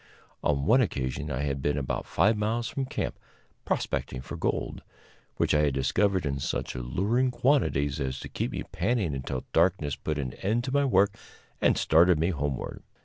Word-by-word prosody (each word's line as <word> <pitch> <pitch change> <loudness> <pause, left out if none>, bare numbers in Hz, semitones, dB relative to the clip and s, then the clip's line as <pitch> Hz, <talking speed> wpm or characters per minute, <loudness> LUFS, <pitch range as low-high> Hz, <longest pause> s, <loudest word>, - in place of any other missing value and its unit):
On 70 -2 +1
one 125 - +5
occasion 65 - -2
I 70 - -2
had 70 -2 -2
been 75 +2 0
about 70 -3 -2
five 110 +2 +3
miles 110 +3 -1
from 135 - -2
camp, - - -3 0.5
prospecting 65 - -2
for - - -7
gold, - - -2 0.6
which - - +2
I 75 - +4
had 70 -3 0
discovered 95 +7 +1
in 70 -1 -1
such - - -2
alluring 100 - 0
quantities 120 - +1
as 65 -1 -2
to - - -6
keep - - -2
me - - -3
panning 100 - 0
until 65 -1 -4
darkness 80 -4 +2
put 75 -1 -3
an 65 -4 -3
end 110 +5 +1
to 130 - -3
my 140 0 +3
work 100 -5 +3 0.5
and - - +4
started 85 +2 +5
me 85 +4 +1
homeward. 70 -4 -3
80 Hz, 180 wpm, -28 LUFS, 70-110 Hz, 0.6 s, one